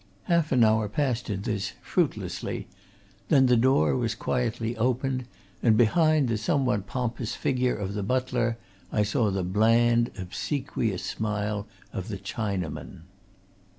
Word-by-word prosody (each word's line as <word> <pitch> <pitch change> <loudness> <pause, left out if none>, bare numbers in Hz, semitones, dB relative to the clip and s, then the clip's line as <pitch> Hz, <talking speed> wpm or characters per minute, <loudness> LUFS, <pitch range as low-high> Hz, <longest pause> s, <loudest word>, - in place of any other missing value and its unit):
Half 170 -3 +1
an 125 -3 +5
hour 110 -1 +3
passed 125 -1 -1
in 100 -1 -3
this 105 -4 -2
fruitlessly; 100 - -2 0.6
then 135 -1 +6
the 125 -1 +5
door 130 +4 +3
was 115 -3 -1
quietly 120 -1 -1
opened 130 +2 0 0.4
and 110 -3 +4
behind 155 +5 +4
the 115 -2 0
somewhat 125 -4 0
pompous 120 -2 -3
figure 125 -1 0
of 100 -1 -4
the 105 - -2
butler 120 +1 0 0.3
I 105 - +2
saw 110 +1 +1
the 95 -1 -1
bland, 115 +5 +3
obsequious 110 - -2
smile 105 0 -2 0.3
of 95 - -4
the 105 - -4
Chinaman. 100 -4 -4
115 Hz, 135 wpm, -27 LUFS, 105-125 Hz, 0.6 s, then